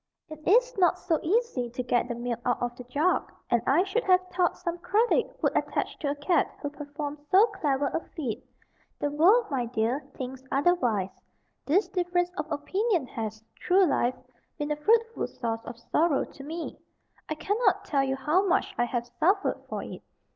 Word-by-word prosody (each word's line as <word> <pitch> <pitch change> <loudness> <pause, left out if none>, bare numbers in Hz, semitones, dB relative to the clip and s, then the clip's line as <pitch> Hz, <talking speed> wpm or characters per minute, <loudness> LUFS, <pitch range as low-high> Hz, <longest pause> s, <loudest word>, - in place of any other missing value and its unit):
It 310 -1 -8
is - - +4
not 360 -1 +4
so 340 -3 0
easy 360 - 0
to 250 +2 -4
get 245 0 +1
the 240 - -3
milk 240 0 -3
out 245 - +1
of 245 0 -1
a - - -6
jug, 295 +9 +1 0.2
and 235 - +4
I 310 +7 +5
should 430 +5 -1
have 370 -1 +4
thought 355 -1 +1
some 345 0 -4
credit 440 +7 +1
would - - +2
attach - - -1
to 285 - -1
a 285 - -1
cat 295 +3 +1
who 290 - -4
performed 290 0 -6
so 390 +4 +7
clever 295 - -1
a 280 - 0 0.2
feat. 260 -10 -3 0.5
The 290 - -1
world, 380 +11 +5
my 250 -3 0
dear, 230 +3 0 0.2
thinks 260 0 -6
otherwise. 260 - +2 0.6
This 370 +9 +3
difference 355 -1 0
of 305 +1 -4
opinion 365 - 0
has, 220 -2 -5 0.2
through 375 +1 +5
life, 255 -5 +1 0.4
been 295 0 -3
a - - +2
fruitful 455 +9 +2
source 225 -1 -4
of 235 - -7
sorrow 300 +5 +1
to 275 - -13
me. 325 +4 -6 0.5
I 310 - -1
cannot 415 +9 +1
tell 275 -2 +1
you 265 0 0
how 300 +8 +2
much 375 +2 +1
I 240 - +4
have 240 0 -2
suffered 390 +4 +2
for - - -3
it. - - -8
300 Hz, 185 wpm, -28 LUFS, 255-370 Hz, 0.6 s, so